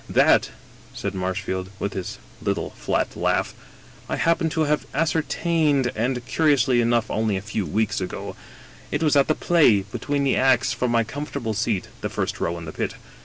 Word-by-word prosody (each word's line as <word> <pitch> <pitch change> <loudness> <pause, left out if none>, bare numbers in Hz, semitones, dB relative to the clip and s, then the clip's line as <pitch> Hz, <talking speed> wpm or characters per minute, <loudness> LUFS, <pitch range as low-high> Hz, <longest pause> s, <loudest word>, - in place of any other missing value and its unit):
"That," - - +4 0.5
said 100 - -3
Marshfield, 95 0 -3
with 100 0 -3
his 95 -2 -5 0.2
little - - -1
flat - - -2
laugh, - - 0 0.6
"I - - 0
happen 165 0 +2
to 160 - -1
have 150 -1 +1
ascertained 155 -3 +1
— - - -23
^and, 125 +2 -1
curiously 130 -4 +3
enough, 120 -1 +1
only 110 -2 0
a - - -4
few 105 -2 -3
weeks 105 +5 0
ago. 90 - -5 0.5
It 145 +2 -1
was 150 -2 +3
at 140 -1 +5
the 155 - +2
play, 150 - +4
between 140 +8 -2
the 135 - +2
acts, 130 -2 +3
from 125 - -1
my 115 -1 +3
comfortable 135 -1 -4
seat 105 -2 -1
(the - - -2
first - - -2
row 85 +1 -1
in 85 - -7
the 80 - -6
pit). - - -3
120 Hz, 180 wpm, -24 LUFS, 105-145 Hz, 0.6 s, at